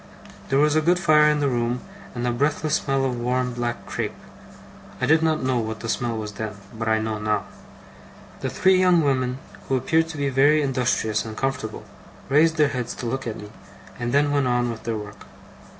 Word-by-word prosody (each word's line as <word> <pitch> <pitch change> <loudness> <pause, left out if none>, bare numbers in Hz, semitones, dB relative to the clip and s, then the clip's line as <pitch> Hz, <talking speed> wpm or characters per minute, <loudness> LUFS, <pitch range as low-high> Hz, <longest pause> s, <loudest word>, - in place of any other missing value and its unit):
There 135 - +2
was 150 +1 +3
a 155 - +4
good 175 +3 +3
fire 150 -4 +5
in 150 -1 +1
the 145 - +2
room, 120 -1 -1 0.3
and 120 0 -2
a 120 - +1
breathless 145 +4 0
smell 135 -2 +1
of 125 -2 -2
warm 125 +1 0
black 120 -1 -3
crape - - -3 0.8
I - - +1
did 160 +1 +4
not 160 -3 +1
know 130 -1 +1
what 110 -1 -4
the 115 - -5
smell 120 -1 -1
was 105 -1 -5
then, 105 +1 -5 0.2
but 110 0 -4
I 110 0 +3
know 110 0 -2
now. 105 0 0 1.0
The - - -2
three 190 0 +3
young 180 -2 +5
women, 130 -3 0 0.3
who 135 - +1
appeared 160 +6 +1
to 160 -1 -7
be 140 -1 0
very 145 +3 +4
industrious 120 -5 0
and 110 -1 -8
comfortable, 125 -6 -3 0.5
raised 160 +3 +4
their 150 -2 +4
heads 125 -4 -4
to - - -6
look 135 +2 -3
at 115 - -4
me, 105 0 -10 0.5
and 120 0 -2
then 145 +2 +3
went 140 -2 +2
on 120 -1 +1
with 115 - -9
their 115 -2 -1
work. 105 -1 -10
130 Hz, 210 wpm, -23 LUFS, 115-150 Hz, 1.0 s, fire